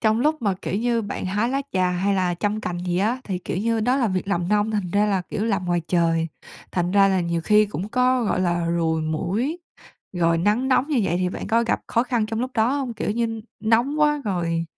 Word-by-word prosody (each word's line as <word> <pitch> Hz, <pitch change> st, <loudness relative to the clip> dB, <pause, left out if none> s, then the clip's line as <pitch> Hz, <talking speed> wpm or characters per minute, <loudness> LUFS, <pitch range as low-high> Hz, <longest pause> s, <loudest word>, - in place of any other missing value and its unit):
trong 220 Hz, 0 st, +2 dB
lúc 305 Hz, +1 st, +1 dB
mà, 200 Hz, -3 st, +1 dB
kiểu -, -, -3 dB
như, 235 Hz, +1 st, 0 dB
bạn 205 Hz, -2 st, -4 dB
hái 205 Hz, +5 st, 0 dB
lá 275 Hz, +2 st, -1 dB
trà 185 Hz, -1 st, +2 dB
hay 190 Hz, +3 st, 0 dB
là 180 Hz, -2 st, +1 dB
chăm 205 Hz, +4 st, -1 dB
cành 175 Hz, -4 st, -4 dB
gì 175 Hz, 0 st, 0 dB
á, 225 Hz, +6 st, +1 dB
thì, 190 Hz, -3 st, -3 dB
kiểu 180 Hz, -, -5 dB
như, 225 Hz, +3 st, 0 dB
đó 250 Hz, +4 st, +2 dB
là 250 Hz, -5 st, +1 dB
việc 185 Hz, 0 st, -2 dB
làm 175 Hz, -3 st, 0 dB
nông, 210 Hz, +1 st, +2 dB
thành 205 Hz, -5 st, -2 dB
ra 205 Hz, +1 st, +3 dB
là, 195 Hz, -3 st, 0 dB
kiểu, 205 Hz, +4 st, -4 dB
làm 200 Hz, -5 st, 0 dB
ngoài 175 Hz, -1 st, +1 dB
trời, 165 Hz, -2 st, +2 dB, 0.5 s
thành 175 Hz, -1 st, 0 dB
ra 195 Hz, 0 st, +5 dB
là 190 Hz, -1 st, +2 dB
nhiều 170 Hz, -1 st, -1 dB
khi 210 Hz, 0 st, +5 dB
cũng 200 Hz, -1 st, -5 dB
có, 250 Hz, +1 st, +2 dB
gọi 195 Hz, -, 0 dB
là, 175 Hz, -1 st, 0 dB
ruồi 165 Hz, -1 st, 0 dB
muỗi 195 Hz, -, -1 dB, 0.6 s
rồi 165 Hz, -1 st, +2 dB
nắng 210 Hz, +9 st, +1 dB
nóng 260 Hz, +2 st, +2 dB
như 285 Hz, -6 st, +2 dB
vậy 175 Hz, -2 st, 0 dB
thì 180 Hz, -, +1 dB
bạn -, -, -6 dB
có 230 Hz, +2 st, +2 dB
gặp 235 Hz, -, 0 dB
khó 235 Hz, -, +1 dB
khăn 240 Hz, -3 st, 0 dB
trong 225 Hz, +1 st, -3 dB
lúc 255 Hz, +1 st, -2 dB
đó 225 Hz, +1 st, +2 dB
hông? 255 Hz, -4 st, -3 dB
Kiểu 220 Hz, -, -2 dB
như 225 Hz, 0 st, -1 dB, 0.2 s
nóng 240 Hz, +7 st, +2 dB
quá 295 Hz, -1 st, +3 dB
rồi 170 Hz, -4 st, -1 dB
205 Hz, 250 wpm, -23 LUFS, 180-235 Hz, 0.6 s, ra